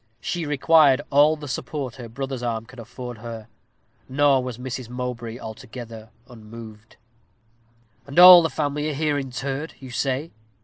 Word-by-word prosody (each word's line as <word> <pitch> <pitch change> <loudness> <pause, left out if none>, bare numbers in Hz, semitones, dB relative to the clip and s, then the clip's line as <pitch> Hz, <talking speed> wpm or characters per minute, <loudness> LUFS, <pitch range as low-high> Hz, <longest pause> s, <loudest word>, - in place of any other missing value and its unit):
She 170 +3 -3
required 145 -1 +4
all 145 +2 +5
the 150 -1 -9
support 135 -1 -5
her 120 -3 -9
brother's 135 +1 -5
arm 115 -2 -3
could 130 +2 -14
afford 120 0 -9
her; 115 -1 -8 0.6
nor 135 -1 +3
was 125 -3 -6
Mrs. 130 -1 -6
Mowbray 120 -2 -5
altogether 110 0 -9 0.2
unmoved. 110 -2 -12 1.1
"And 140 - -9
all 180 0 +11
the 165 - 0
family 150 0 -2
are - - -3
here 150 -1 0
interred, 135 +3 -5
you 130 -2 -10
say?" 135 +5 -2
130 Hz, 145 wpm, -23 LUFS, 115-145 Hz, 1.1 s, all